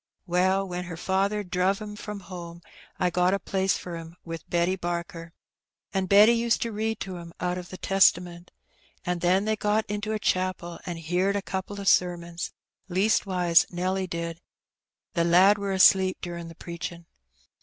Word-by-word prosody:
Wellj 190 Hz, +2 st, +2 dB
when 180 Hz, 0 st, -4 dB
her 170 Hz, -2 st, -7 dB
father 195 Hz, +4 st, 0 dB
drav 185 Hz, +1 st, 0 dB
'em 210 Hz, -1 st, -7 dB
from 210 Hz, -1 st, -7 dB
home, 175 Hz, -2 st, -9 dB, 0.4 s
I 180 Hz, -1 st, +2 dB
got 180 Hz, +2 st, +2 dB
a -, -, -3 dB
place 190 Hz, -1 st, 0 dB
for 175 Hz, -1 st, -7 dB
'em 165 Hz, 0 st, -9 dB
wi' 165 Hz, -1 st, -5 dB
Betty 175 Hz, +2 st, +1 dB
Barker. 170 Hz, -2 st, -5 dB, 0.6 s
An' 190 Hz, -1 st, 0 dB
Betty 215 Hz, +4 st, +6 dB
oBed 235 Hz, -1 st, +2 dB
to 230 Hz, -, -1 dB
read 220 Hz, +1 st, -2 dB
to 185 Hz, -2 st, -5 dB
'em 170 Hz, -1 st, -10 dB
oat 180 Hz, 0 st, -1 dB
o' -, -, -4 dB
the 180 Hz, +1 st, -10 dB
Testament. 180 Hz, -3 st, +2 dB, 0.6 s
An' 180 Hz, 0 st, -1 dB
then 185 Hz, +3 st, +2 dB
they 220 Hz, 0 st, +1 dB
got 210 Hz, +1 st, +1 dB
into 210 Hz, +1 st, -3 dB
a 215 Hz, -, 0 dB
chapel, 185 Hz, -4 st, -1 dB
an' 175 Hz, -2 st, -4 dB
heerd 180 Hz, +5 st, 0 dB
a 200 Hz, -, -1 dB
conple 195 Hz, +2 st, -4 dB
o' -, -, -5 dB
Bermons 170 Hz, -2 st, +1 dB, 0.2 s
— -, -, -44 dB
leastaway 185 Hz, -3 st, +3 dB
Nelly 185 Hz, +2 st, -1 dB
didj 170 Hz, -1 st, -4 dB, 0.7 s
the 170 Hz, -, +2 dB
lad 185 Hz, +5 st, +5 dB
were 200 Hz, -1 st, -2 dB
asleep 190 Hz, 0 st, +5 dB
durin' 170 Hz, -1 st, -6 dB
the 165 Hz, -, -11 dB
preadiin'. 170 Hz, 0 st, -7 dB
185 Hz, 175 wpm, -26 LUFS, 175-195 Hz, 0.7 s, Betty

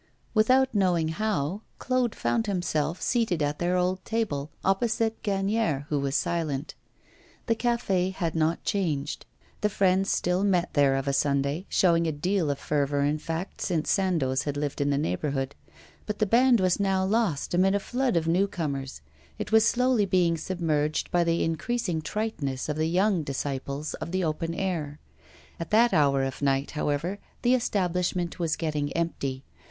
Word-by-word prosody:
Without 255 Hz, +4 st, +4 dB
knowing 180 Hz, -6 st, +2 dB
how, 185 Hz, -1 st, -1 dB, 0.2 s
Claude 255 Hz, -3 st, 0 dB
found 225 Hz, -2 st, 0 dB
himself 175 Hz, -4 st, -1 dB
seated 220 Hz, -10 st, +1 dB
at 145 Hz, 0 st, -1 dB
their 175 Hz, +1 st, +1 dB
old 180 Hz, +1 st, 0 dB
table, 155 Hz, -11 st, -2 dB, 0.2 s
opposite 220 Hz, +3 st, +1 dB
Gagnière, 195 Hz, -7 st, 0 dB
who 145 Hz, -, +1 dB
was 140 Hz, 0 st, -1 dB
silent. 155 Hz, -3 st, -1 dB, 0.7 s
The 230 Hz, -, +2 dB
café 220 Hz, -6 st, 0 dB
had 175 Hz, -4 st, -2 dB
not 160 Hz, +1 st, 0 dB
changed. 155 Hz, -9 st, -2 dB, 0.3 s
The 210 Hz, -, +2 dB
friends 195 Hz, -1 st, +2 dB
still 180 Hz, +2 st, +1 dB
met 180 Hz, -3 st, +1 dB
there 140 Hz, -2 st, +4 dB
of 135 Hz, 0 st, -2 dB
a 140 Hz, -, +1 dB
Sunday, 140 Hz, +5 st, 0 dB
showing 170 Hz, -2 st, +3 dB
a -, -, +1 dB
deal 175 Hz, +2 st, 0 dB
of 140 Hz, -, -1 dB
fervour, 145 Hz, -1 st, 0 dB
in 145 Hz, +2 st, +1 dB
fact, 165 Hz, +4 st, -5 dB
since 165 Hz, -4 st, 0 dB
Sandoz 160 Hz, -9 st, +1 dB
had 145 Hz, -1 st, -2 dB
lived 145 Hz, -1 st, -2 dB
in 140 Hz, -, +1 dB
the 140 Hz, -, +1 dB
neighbourhood; 135 Hz, -, -1 dB, 0.5 s
but 210 Hz, -1 st, -3 dB
the 215 Hz, -, +2 dB
band 240 Hz, +3 st, +4 dB
was 185 Hz, 0 st, +2 dB
now 190 Hz, -1 st, +1 dB
lost 200 Hz, -9 st, 0 dB
amid 190 Hz, +3 st, +3 dB
a -, -, +2 dB
flood 250 Hz, -1 st, 0 dB
of 165 Hz, -1 st, 0 dB
new 180 Hz, +4 st, +3 dB
comers; 140 Hz, -, -4 dB, 0.4 s
it -, -, -5 dB
was 220 Hz, +1 st, +5 dB
slowly 250 Hz, -4 st, +2 dB
being 175 Hz, -3 st, +2 dB
submerged 155 Hz, -3 st, -1 dB
by 175 Hz, -1 st, +3 dB
the 170 Hz, 0 st, +1 dB
increasing 170 Hz, +1 st, -1 dB
triteness 155 Hz, -8 st, -3 dB
of 150 Hz, -, -2 dB
the 155 Hz, +1 st, 0 dB
young 185 Hz, +1 st, +2 dB
disciples 140 Hz, +1 st, -4 dB
of 165 Hz, -, -6 dB
the 185 Hz, 0 st, 0 dB
'open 165 Hz, +1 st, -2 dB
air.' 160 Hz, -6 st, -3 dB, 0.6 s
At 165 Hz, -, -5 dB
that 235 Hz, +3 st, +4 dB
hour 140 Hz, -3 st, +3 dB
of 135 Hz, +1 st, -4 dB
night, 135 Hz, 0 st, +1 dB
however, 150 Hz, +6 st, -2 dB, 0.2 s
the 245 Hz, +1 st, +4 dB
establishment 180 Hz, -6 st, 0 dB
was 165 Hz, -2 st, 0 dB
getting 150 Hz, -3 st, -2 dB
empty. 140 Hz, -6 st, -2 dB
170 Hz, 170 wpm, -27 LUFS, 145-200 Hz, 0.7 s, was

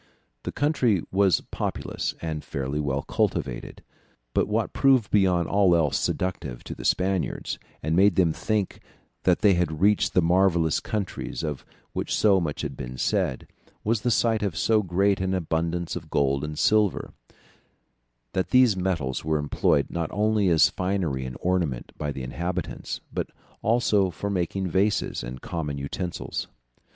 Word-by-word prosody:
The -, -, -4 dB
country 125 Hz, -, +1 dB
was 95 Hz, -3 st, +3 dB
populous -, -, -3 dB
and 80 Hz, -2 st, -3 dB
fairly 70 Hz, +1 st, -3 dB
well 70 Hz, -1 st, -1 dB
cultivated, 65 Hz, -3 st, -2 dB, 0.5 s
but -, -, +2 dB
what -, -, -1 dB
proved 130 Hz, -6 st, +3 dB
beyond 90 Hz, -4 st, +3 dB
all 100 Hz, -3 st, +4 dB
else 75 Hz, -5 st, +2 dB
seductive 75 Hz, -9 st, -2 dB
to -, -, -6 dB
the -, -, -9 dB
Spaniards, 95 Hz, 0 st, 0 dB, 0.2 s
and 80 Hz, +2 st, 0 dB
made 95 Hz, 0 st, +5 dB
them 85 Hz, -3 st, +3 dB
think 105 Hz, 0 st, -1 dB, 0.5 s
that 90 Hz, -2 st, +3 dB
they 100 Hz, -2 st, +6 dB
had 85 Hz, -3 st, 0 dB
reached 105 Hz, +3 st, +3 dB
the 90 Hz, -, +6 dB
marvellous 85 Hz, -2 st, +3 dB
countries 105 Hz, -6 st, -4 dB
of 75 Hz, -3 st, -3 dB, 0.3 s
which -, -, -1 dB
so 100 Hz, -3 st, +4 dB
much 75 Hz, -4 st, -3 dB
had -, -, -4 dB
been 65 Hz, 0 st, -7 dB
said, -, -, 0 dB, 0.4 s
was 110 Hz, 0 st, +1 dB
the 120 Hz, -, +1 dB
sight 115 Hz, -1 st, +2 dB
of 100 Hz, -5 st, -2 dB
so 110 Hz, +2 st, +3 dB
great 95 Hz, +1 st, +1 dB
an 95 Hz, 0 st, 0 dB
abundance 85 Hz, 0 st, -1 dB
of -, -, -7 dB
gold 70 Hz, -1 st, +1 dB
and 75 Hz, 0 st, -4 dB
silver, 105 Hz, -3 st, +2 dB, 1.2 s
that 95 Hz, -, -1 dB
these 125 Hz, -5 st, +5 dB
metals 85 Hz, -9 st, -1 dB
were 80 Hz, +1 st, +1 dB
employed 75 Hz, -1 st, +1 dB
not 85 Hz, -2 st, -2 dB
only 105 Hz, 0 st, +2 dB
as 80 Hz, -2 st, +6 dB
finery 90 Hz, -9 st, -1 dB
and 65 Hz, -, -7 dB
ornament 85 Hz, -9 st, -1 dB
by 75 Hz, -1 st, -3 dB
the 65 Hz, -2 st, -6 dB
inhabitants, 85 Hz, +6 st, -4 dB
but -, -, -2 dB, 0.3 s
also 105 Hz, -4 st, +2 dB
for 100 Hz, +5 st, -4 dB
making 95 Hz, +1 st, -1 dB
vases 95 Hz, +4 st, +1 dB
and 60 Hz, +1 st, -7 dB
common 75 Hz, -4 st, -4 dB
utensils. 85 Hz, +6 st, -4 dB
90 Hz, 155 wpm, -26 LUFS, 75-100 Hz, 1.2 s, they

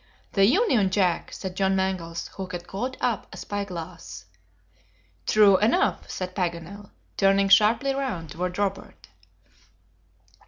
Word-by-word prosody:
"The 195 Hz, -1 st, +5 dB
Union 255 Hz, -, +3 dB
Jack," 185 Hz, -3 st, 0 dB
said 190 Hz, -2 st, -6 dB
John 195 Hz, 0 st, +1 dB
Mangles, 185 Hz, -3 st, -2 dB
who 190 Hz, -1 st, -7 dB
had 175 Hz, -1 st, -7 dB
caught 250 Hz, +8 st, -4 dB
up 235 Hz, -6 st, -1 dB
a -, -, -10 dB
spy 205 Hz, 0 st, -4 dB
glass. 95 Hz, -, -8 dB, 1.0 s
"True 205 Hz, -3 st, +6 dB
enough," 240 Hz, -, +1 dB
said 185 Hz, 0 st, -5 dB
Paganel, 180 Hz, +2 st, -4 dB, 0.3 s
turning 195 Hz, 0 st, +3 dB
sharply 225 Hz, +7 st, +4 dB
round 230 Hz, -, -4 dB
toward 180 Hz, +2 st, -4 dB
Robert. 200 Hz, -1 st, -4 dB
195 Hz, 125 wpm, -25 LUFS, 180-210 Hz, 1.0 s, True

